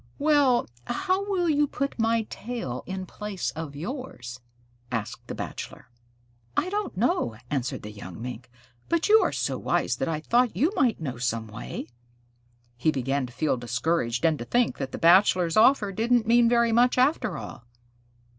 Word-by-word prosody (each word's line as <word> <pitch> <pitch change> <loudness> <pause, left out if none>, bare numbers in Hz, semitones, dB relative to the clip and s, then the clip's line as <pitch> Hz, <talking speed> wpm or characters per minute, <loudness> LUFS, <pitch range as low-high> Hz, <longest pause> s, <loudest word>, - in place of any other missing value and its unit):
"Well, 285 -4 +3 0.2
how 390 +2 -1
will 360 -3 +1
you 295 -2 +3
put 275 -2 -3
my 225 0 +2
tail 225 - -5
in 190 0 -4
place 205 0 -4
of 160 -3 -7
yours?" 155 - -6 0.5
asked 115 -3 -4
the - - -5
Bachelor. - - -7 0.7
"I 370 - +1
don't 415 - -3
know," 150 - +1
answered 130 -3 -2
the 105 - -7
young 100 -4 -9
Mink, 125 +1 -7 0.4
"but 335 -1 +1
you 435 +1 +8
are - - +1
so - - -2
wise - - 0
that - - -1
I 160 -2 -1
thought 240 +8 +1
you 310 +9 +3
might 245 -4 +2
know 130 -7 -5
some 115 -2 -1
way." 110 +2 -7 0.9
He 130 +6 +1
began 135 -1 0
to - - -13
feel 150 +1 0
discouraged, 125 +1 -1
and 160 -2 +2
to 120 - -5
think 240 - +1
that 135 -1 -3
the - - -5
Bachelor's 175 -1 +4
offer 220 -2 +5
didn't 230 +3 +2
mean 235 +1 +5
very 235 -1 +3
much 245 +3 +4
after 255 - +2
all. 120 - -9
190 Hz, 170 wpm, -26 LUFS, -, 0.9 s, you